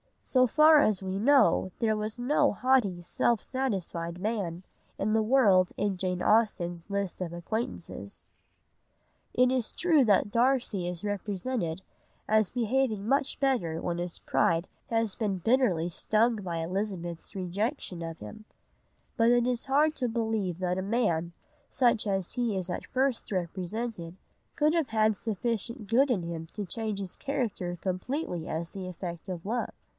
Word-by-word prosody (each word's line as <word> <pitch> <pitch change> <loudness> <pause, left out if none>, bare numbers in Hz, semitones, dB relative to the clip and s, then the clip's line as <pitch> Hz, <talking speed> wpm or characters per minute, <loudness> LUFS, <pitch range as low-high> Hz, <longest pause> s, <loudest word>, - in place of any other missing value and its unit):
So 255 -1 +3
far 305 +4 +6
as 210 -8 +2
we 190 +1 -2
know 260 -5 +4
there 220 -2 +2
was 215 +1 -3
no 285 +3 +2
haughty, 235 -7 +2
self 220 +5 +1
satisfied 185 -10 -2
man 190 -4 -2 0.3
of 215 +2 0
the 220 - +3
world 215 -6 +4
in 200 -2 0
Jane 180 -1 -2
Austen's 175 -6 +1
list 200 -2 -2
of 170 -2 -3
acquaintances. 220 +7 -5 1.1
It 250 0 +4
is 255 -4 -1
true 320 -7 +3
that 205 -1 +3
Darcy 235 -6 +1
is 175 0 -5
represented 200 -2 -2 0.5
as 215 -2 +3
behaving 240 -3 0
much 275 +2 +1
better 215 - 0
when 175 -1 -2
his 175 0 -3
pride 170 +1 +1 0.2
has 225 -3 0
been 205 -4 -1
bitterly 190 -6 +2
stung 220 +6 +2
by 180 -5 -4
Elizabeth's 175 0 -3
rejection 190 - -3
of 165 -1 -6
him, 215 0 -10 0.7
but 230 0 +4
it 240 0 +4
is 250 -1 0
hard 295 +3 +3
to 250 - 0
believe 220 -6 -1
that 180 -1 -1
a - - -2
man, 180 -6 0 0.4
such 235 -4 +2
as 195 -3 0
he 240 -4 0
is 185 -1 -2
at 180 - -4
first 260 -3 0
represented, 185 +1 -3 0.4
could 305 +1 +3
have 330 -5 +1
had 220 -1 +2
sufficient 230 +1 -3
good 260 +6 +4
in 205 -8 +1
him 165 -1 -5
to 210 - -4
change 215 +1 -3
his 190 -2 -4
character 215 -10 -3
completely 185 - -3
as 165 +1 -3
the 190 -2 -7
effect 170 -2 -6
of 180 -2 -5
love. 235 +4 -1
210 Hz, 155 wpm, -29 LUFS, 180-245 Hz, 1.1 s, far